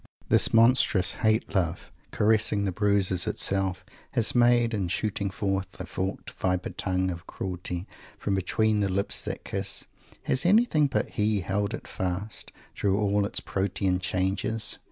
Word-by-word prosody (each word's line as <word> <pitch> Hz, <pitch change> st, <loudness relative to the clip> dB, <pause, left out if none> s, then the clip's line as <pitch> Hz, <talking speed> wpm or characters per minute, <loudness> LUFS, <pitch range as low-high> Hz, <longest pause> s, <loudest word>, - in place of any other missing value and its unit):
This -, -, +4 dB
monstrous 115 Hz, -5 st, +4 dB
hate 110 Hz, 0 st, +1 dB
love, 90 Hz, -3 st, -1 dB, 0.2 s
caressing 105 Hz, -1 st, +2 dB
the 95 Hz, -, 0 dB
bruises 95 Hz, -2 st, +1 dB
itself 95 Hz, -1 st, +1 dB, 0.3 s
has 115 Hz, -, +1 dB
made, 120 Hz, -1 st, +4 dB
and 95 Hz, -5 st, -2 dB
shooting 100 Hz, +1 st, -1 dB
forth 95 Hz, 0 st, -3 dB
a -, -, -4 dB
forked 95 Hz, +1 st, -4 dB
viper 90 Hz, -1 st, -2 dB
tongue 95 Hz, -1 st, -1 dB
of 85 Hz, -1 st, -8 dB
cruelty 90 Hz, -1 st, -5 dB, 0.3 s
from 100 Hz, -, -2 dB
between 105 Hz, +3 st, +1 dB
the 100 Hz, -1 st, +1 dB
lips 100 Hz, +1 st, +1 dB
that -, -, -5 dB
kiss 95 Hz, -1 st, -1 dB, 0.4 s
has 130 Hz, -, +2 dB
anyone 180 Hz, -6 st, +4 dB
but -, -, -1 dB
he 105 Hz, -1 st, 0 dB
held 100 Hz, +4 st, -1 dB
it -, -, -11 dB
fast, 95 Hz, +2 st, -4 dB, 0.2 s
through 100 Hz, -1 st, 0 dB
all 100 Hz, -1 st, +1 dB
its -, -, -2 dB
Protean 95 Hz, -1 st, -1 dB
changes? 95 Hz, +4 st, +2 dB
100 Hz, 150 wpm, -27 LUFS, 95-110 Hz, 0.4 s, This